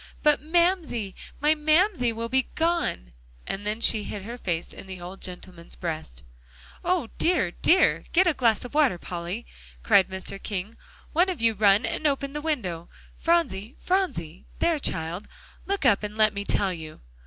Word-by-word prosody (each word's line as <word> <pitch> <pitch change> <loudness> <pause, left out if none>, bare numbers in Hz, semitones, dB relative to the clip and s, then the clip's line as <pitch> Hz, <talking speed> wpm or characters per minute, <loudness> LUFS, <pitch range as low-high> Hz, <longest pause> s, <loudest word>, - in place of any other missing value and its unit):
"But 300 -3 +4
Mamsie, 320 - +1 0.3
my 300 +2 +4
Mamsie 310 - +3
will 230 +1 -4
be 260 +2 +1
gone!" 325 - 0 0.3
and 205 +2 -4
then 215 +2 -1
she 220 -2 +4
hid 200 -1 -6
her 230 +4 -6
face 175 -8 -3
in - - -11
the 185 -1 -7
old 180 +2 -9
gentleman's 180 -2 -8
breast. 155 - -5 0.6
"O 350 -9 0
dear, 330 - +2
dear! 370 - +3
get 370 +2 +5
a 345 - +3
glass 235 -4 +2
of 245 - -9
water, 290 -11 +3
Polly," 175 +6 -5 0.4
cried 200 -4 +5
Mr. 190 +1 -6
King. 205 +2 -4 0.4
"One 350 +4 +3
of 365 - -3
you 225 0 +3
run 205 +1 +4
and 310 - 0
open 275 -1 -1
the 295 - -3
window. 190 - -3 0.3
Phronsie, 270 - +1
Phronsie 185 - -1
there, 335 -3 +2
child, 170 - -2 0.4
look 395 -6 -1
up 205 -6 +5
and 210 0 -5
let 215 -1 +4
me 200 0 -4
tell 195 -2 +1
you." 155 -2 -9
225 Hz, 170 wpm, -26 LUFS, 190-310 Hz, 0.6 s, get